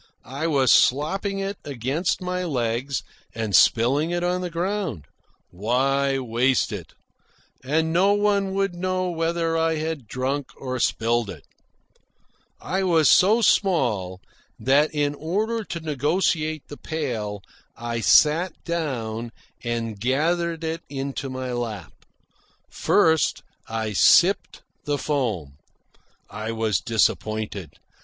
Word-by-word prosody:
I 140 +6 -3
was 135 -5 +3
slopping 190 +9 +2
it 195 0 -3
against 145 +8 -2
my 180 0 -2
legs 130 -3 -2 0.3
and 110 -4 -1
spilling 130 - +4
it 175 0 -1
on 180 +1 0
the 180 - -3
ground. 170 - -3 0.5
Why 135 +8 +1
waste 125 +1 +1
it? - - -7 0.7
And 160 +4 0
no 195 +4 +4
one 200 -2 +1
would 195 -1 0
know 185 +1 -1
whether 165 0 -1
I 165 0 +1
had 155 -5 -4
drunk 130 +4 -3
or 130 -1 -4
spilled 115 -1 +1
it. 80 -6 -9 1.1
I 190 +1 -2
was 165 -5 +4
so 215 +5 +5
small 110 - +1 0.4
that, 140 +4 +3
in 145 -1 0
order 210 +10 -2
to 170 - -5
negotiate 155 +1 0
the 145 - -9
pail, 110 -10 -4 0.3
I 115 0 -3
sat 160 +9 +4
down 120 -9 -3 0.3
and 115 -3 -3
gathered 165 - 0
it 165 +1 -3
into 135 0 -4
my 130 -1 -4
lap. 110 -7 -5 0.8
First 160 -1 +2 0.2
I 110 -1 -3
sipped 95 - +4 0.2
the 145 -1 0
foam. 110 - -2 0.7
I 110 +2 -5
was 110 -5 0
disappointed. 110 -4 -1
145 Hz, 120 wpm, -24 LUFS, 115-170 Hz, 1.1 s, so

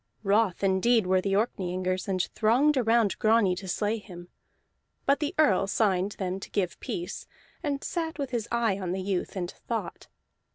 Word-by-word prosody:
Wroth 200 -2 +2
indeed 195 +3 +3
were 185 0 +3
the 195 +1 -1
Orkneyingers, 185 -3 -1
and 185 -2 +1
thronged 255 +7 +3
around 230 -4 +2
Grani 215 -4 +3
to 190 - -7
slay 210 +4 -1
him; 175 -4 -11 0.8
but 280 +1 +3
the 300 +4 -2
Earl 195 -11 +4
signed 195 -1 +1
them 190 -1 -3
to - - -9
give 185 -3 -2
peace, 175 0 -5 0.3
and 285 -4 -2
sat 325 -2 -3
with 275 -3 -3
his 235 -3 -2
eye 230 -4 +1
on 180 -2 -2
the 190 - -2
youth, 190 -1 -2
and 180 -2 -3
thought. 220 -7 -5
200 Hz, 170 wpm, -28 LUFS, 185-235 Hz, 0.8 s, Earl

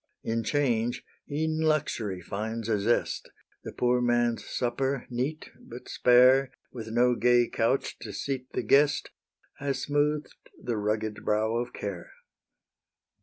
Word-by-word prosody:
In 115 0 -1
change 120 -3 0 0.3
e'en 155 +2 -1
luxury 145 - 0
finds 110 +5 -4
a 105 -2 +2
zest: 115 +4 0 0.3
The - - -6
poor 125 0 +1
man's 120 -1 +1
supper, 130 +2 -2
neat, 135 +6 -3
but 120 +2 -11
spare, 125 +2 +5 0.2
With 115 -3 -7
no 120 +2 +3
gay 120 +1 +4
couch 115 +4 0
to - - -7
seat 130 -2 -4
the - - -1
guest, 145 +1 +3 0.5
Has 135 -2 -2
smooth'd 145 +1 0 0.3
the 120 -3 -3
rugged 105 0 -2
brow 110 +2 +1
of 120 +1 -2
care. 95 -4 -6
120 Hz, 130 wpm, -28 LUFS, 110-135 Hz, 0.5 s, spare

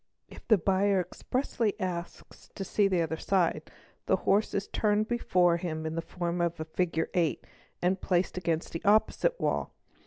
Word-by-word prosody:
If - - -14
the 220 - +6
buyer 195 +2 +2
expressly 220 +4 -2
asks 175 -2 -6
to 195 - -4
see 200 +1 +2
the 180 -3 +1
other 160 0 -3
side, 185 -4 0 0.4
the - - +4
horse 205 +2 +1
is 200 0 -1
turned 210 0 +1
before 180 -7 +2
him 160 -2 -4
in 160 - -2
the 165 - -2
form 175 0 -3
of 170 -1 0
the 160 - -4
figure 165 0 -1
eight, 170 -4 0 0.4
and 185 +1 +1
placed 180 0 0
against 165 -2 -2
the 165 - -5
opposite 220 - +3
wall. - - -1
180 Hz, 175 wpm, -29 LUFS, 170-200 Hz, 0.4 s, the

